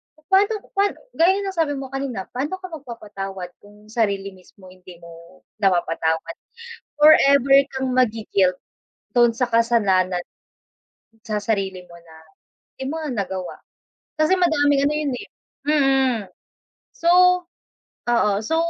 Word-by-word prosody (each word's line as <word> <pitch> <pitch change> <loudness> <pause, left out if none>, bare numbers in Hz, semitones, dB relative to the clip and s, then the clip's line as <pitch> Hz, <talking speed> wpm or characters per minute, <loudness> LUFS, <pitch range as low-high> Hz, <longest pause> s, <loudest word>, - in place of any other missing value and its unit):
papaano 390 +7 +1
paano 400 +1 +1 0.2
gaya 380 +3 +2
ng 390 - -3
sabi 320 -4 0
mo 270 -1 -7
kanina, 270 -8 -4
paano 285 +8 -3
ka 370 -2 -10
magpapatawad 200 - -7
kung 210 +1 -18
sarili 200 -4 -1
mismo 185 0 -18
hindi 185 -1 -14
mo 170 +2 -15 0.2
napapatawad. 165 -3 0 0.7
Forever 280 -3 +6 0.2
kang 265 0 -2
magi-guilt 210 -6 +1 0.6
dun 240 -1 +5
sa 245 +2 -1
kasalanan. 200 -6 +2 1.1
Sa 215 -1 -1
sarili 195 -4 -2
mo 170 - -14
na 165 -1 -17 0.6
di - - -4
mo 320 - -4
nga 305 -3 -4
nagawa, 190 -4 -4 0.6
kasi 310 +5 +3
madaming 290 -6 +2
ano 295 - +1
yun, 300 -3 -1
eh, 410 - -9 0.4
mm. 270 -5 +2 0.7
So 335 - -2 1.0
oo, 235 -3 +2
so 320 +8 0
235 Hz, 125 wpm, -22 LUFS, 190-290 Hz, 1.1 s, Forever